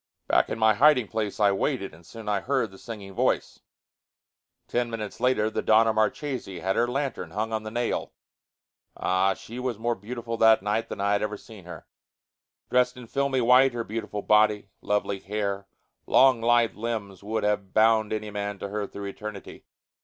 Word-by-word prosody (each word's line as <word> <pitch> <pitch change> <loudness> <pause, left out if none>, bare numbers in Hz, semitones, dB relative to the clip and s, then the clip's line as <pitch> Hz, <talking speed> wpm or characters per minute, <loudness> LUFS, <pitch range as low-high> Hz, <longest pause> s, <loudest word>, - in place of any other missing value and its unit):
Back - - +3
in - - -3
my 110 -1 +4
hiding 130 0 +4
place 110 -1 -3
I 100 -1 +5
waited, 100 +1 -1
and 85 - -16
soon 110 +5 -11
I 105 -1 +1
heard 130 -6 0
the 95 - -14
singing 105 -4 -8
voice. - - 0 1.1
Ten 120 0 -1
minutes 110 -3 -6
later 120 -3 +2
the - - -2
Donna 110 +1 +4
Marchesi 110 - -2
had 95 +3 -1
her 120 - +2
lantern 135 +1 -3
hung 110 +2 -3
on 110 - -1
the 110 - -6
nail. 120 +1 -2 0.9
Ah! 95 +1 +1
She 120 +3 -9
was 125 -3 -2
more 120 +2 0
beautiful 115 +2 -6
that 110 -3 +5
night 110 +3 -1
than - - -6
I 100 +1 +1
had 100 - +2
ever 105 0 -2
seen 105 -4 -14
her. 85 -3 -10 0.9
Dressed 125 0 +2
in 125 - -9
filmy 135 +1 0
white, 125 +2 +5
her 120 -1 -3
beautiful 105 -2 -5
body, 105 -1 +3
lovely 100 -1 -1
hair, 100 -1 -3 0.4
long 130 -3 +5
lithe 120 0 +3
limbs 105 -4 -4
would 110 +2 -2
have 105 -2 0
bound 110 -1 +4
any 110 -1 -3
man 100 0 -4
to 100 - -6
her 105 0 -3
through 100 +1 -8
eternity. 105 0 -8
110 Hz, 185 wpm, -26 LUFS, 100-120 Hz, 1.1 s, I